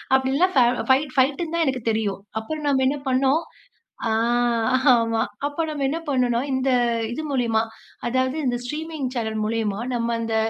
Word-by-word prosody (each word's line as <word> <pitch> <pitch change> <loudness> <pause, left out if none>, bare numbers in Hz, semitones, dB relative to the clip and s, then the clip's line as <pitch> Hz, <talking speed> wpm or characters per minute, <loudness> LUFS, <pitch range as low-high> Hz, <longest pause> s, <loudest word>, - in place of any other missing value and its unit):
அப்பிடில்லாம் 270 +8 +2
ப 255 - +7 0.3
ஃபைட் 265 +1 +3
ஃபைட்ன்னு 285 +5 +1
தான் 335 - +2
எனக்கு 260 -3 -1
தெரியும். 215 -3 -1 0.2
அப்புறம் 300 +7 -5
நம்ம 270 -2 +2
என்ன 290 +2 0
பண்ணோம். 265 +4 +3 0.7
ஆ, - - 0 0.8
ஆமா 230 -1 +2 0.3
அப்போ 290 +3 -2
நம்ம 290 -2 -2
என்ன 315 +4 -1
பண்ணணோன்னா, 250 -4 +2
இந்த 260 0 +1 0.4
இது 315 - -4
மூலியமா 235 -5 +1 0.4
அதாவது 260 +3 0
இந்த 245 -1 +1
ஸ்ட்ரீமிங் 300 +1 -4
சேனல் 220 -3 -2
மூலியமா 215 -2 -1 0.2
நம்ம 235 0 0
இந்த 225 -1 -1
260 Hz, 155 wpm, -23 LUFS, 230-290 Hz, 0.8 s, ப